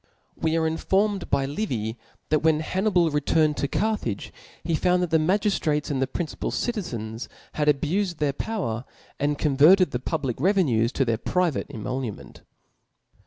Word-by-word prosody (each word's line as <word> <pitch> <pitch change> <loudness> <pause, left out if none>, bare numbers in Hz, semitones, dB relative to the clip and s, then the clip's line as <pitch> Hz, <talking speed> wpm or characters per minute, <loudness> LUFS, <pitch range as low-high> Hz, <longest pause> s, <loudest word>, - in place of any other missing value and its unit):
We 160 0 0
are 160 -1 +2
infermed 195 +5 +1
Chap/ic.^y 135 +1 -1
Livy, 115 - -2 0.3
that 155 - +3
when 155 0 +3
Jlannibal 180 -3 +1
returned 150 +1 +2
toCarthage, 145 - -1 0.3
he 165 +1 -1
found 180 +3 +2
that 175 - -3
the 160 - +4
ihagiftratesand 155 -6 +1
the 135 - +1
principal 160 +3 -4
cid 240 - -1
tenis 115 - -5 0.3
had 150 -1 -1
abufed 170 +5 +1
their 145 -2 0
power, 140 - -3 0.4
and 145 +1 0
Converted 155 +5 +5
(he 125 - 0
public 135 -3 -3
revenues 145 - +2
to 135 - +1
their 115 -2 0
private 180 -4 0
emolument. 125 -2 -5
155 Hz, 145 wpm, -25 LUFS, 135-180 Hz, 0.4 s, Converted